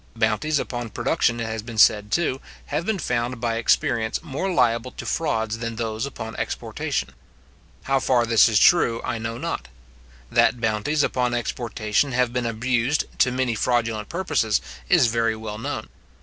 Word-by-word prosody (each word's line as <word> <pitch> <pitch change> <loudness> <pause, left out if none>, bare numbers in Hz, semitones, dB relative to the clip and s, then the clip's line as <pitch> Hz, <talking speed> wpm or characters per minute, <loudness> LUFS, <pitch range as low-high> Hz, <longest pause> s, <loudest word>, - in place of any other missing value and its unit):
Bounties 115 +7 +1
upon 120 -3 -4
production, 115 +2 0
it 115 - -2
has 110 0 -4
been 115 0 -9
said 105 -1 +5
too, 135 -4 0 0.3
have 155 +4 -1
been 220 -2 +1
found 125 -5 -2
by 115 -1 -1
experience 115 -1 +1
more 165 +5 -3
liable 120 -8 +2
to - - -9
frauds 115 -8 -1
than 115 -1 -4
those 110 +2 -2
upon 115 -4 -7
exportation. 65 - -3 0.7
How 135 0 +1
far 125 -2 +2
this 115 0 +5
is 110 - +2
true, 120 -10 +4
I 115 - -2
know 115 +1 -4
not. - - -4 0.6
That 120 - +3
bounties 115 +7 0
upon 125 -1 0
exportation 120 +1 -1
have 125 -1 +1
been 125 -1 -1
abused, 120 +4 0 0.2
to 125 - +4
many 125 -1 0
fraudulent 115 -2 0
purposes, 145 - +1 0.3
is - - +5
very 115 -1 +1
well 110 -1 -6
known. - - -4
115 Hz, 165 wpm, -23 LUFS, 110-130 Hz, 0.7 s, said